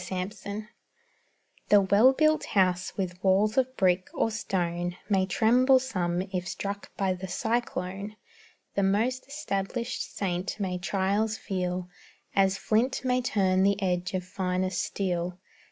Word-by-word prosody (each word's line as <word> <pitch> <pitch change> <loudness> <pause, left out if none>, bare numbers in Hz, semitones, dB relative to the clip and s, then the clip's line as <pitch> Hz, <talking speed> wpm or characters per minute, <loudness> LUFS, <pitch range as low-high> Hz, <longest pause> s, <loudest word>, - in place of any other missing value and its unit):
'STABLISHED 195 +3 -4 1.1
The 205 - +7
well 200 +6 +5
built 310 +3 +3
house 185 -1 +2
with 185 -1 -4
walls 200 +3 +3
of 260 0 +1
brick, 185 -1 +2
or 225 - +1
stone, 175 -4 -2
May 190 -2 +2
tremble 250 +7 +4
some 185 -9 -1
if 180 -1 -2
struck 200 +2 -4
by 190 -2 +1
the 185 +1 -6
cyclone; 200 -1 -2 0.6
The 200 - +1
most 225 +7 +1
established 245 -4 -3
saint 185 +1 -2
may 185 -3 -2
trials 200 +4 0
feel, 180 -3 -3 0.5
As 195 0 +3
flint 240 +6 0
may 255 0 +2
turn 190 -6 +2
the 200 +1 +3
edge 180 -1 -1
of 185 - -1
finest 185 0 -1
steel. 180 -2 -2
195 Hz, 135 wpm, -28 LUFS, 185-220 Hz, 1.1 s, The